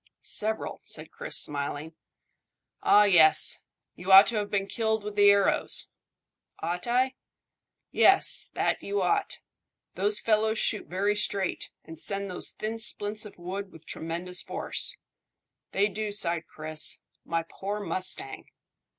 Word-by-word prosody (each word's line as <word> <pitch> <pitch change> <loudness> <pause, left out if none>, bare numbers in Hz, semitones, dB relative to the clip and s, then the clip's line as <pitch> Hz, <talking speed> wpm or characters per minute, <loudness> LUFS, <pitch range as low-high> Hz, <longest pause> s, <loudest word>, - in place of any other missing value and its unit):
"Several," 220 +1 -3
said - - -7
Chris, - - -2
smiling. 145 +2 -1 0.9
"Ah! 210 - +6
Yes! 170 -6 +5 0.3
You 180 +2 -4
ought 195 +2 +10
to 230 - -2
have 205 -1 -2
been 200 -1 -1
killed 220 +1 -1
with 210 0 -6
the 205 0 +5
arrows." 200 -1 +1 0.7
"Ought 175 +5 -4
I?" 255 +2 +1 0.8
"Yes, - - +4
that - - 0
you 405 0 -2
ought. 410 -1 0 0.6
Those 415 0 +2
fellows 220 0 +1
shoot 210 - 0
very 200 +3 0
straight, 200 -2 -1
and 160 -1 -11
send 200 +1 -2
those 180 - +1
thin 220 +1 -5
splints 215 -1 +1
of 205 - -16
wood 190 +3 -6
with 160 -1 -16
tremendous 175 +3 -4
force." - - -3 0.7
"They 200 +1 +2
do," 210 0 -3
sighed 170 -5 0
Chris. 155 0 0 0.2
"My 165 0 -2
poor 200 +4 -5
mustang!" 205 - -2
200 Hz, 135 wpm, -27 LUFS, 175-215 Hz, 0.9 s, ought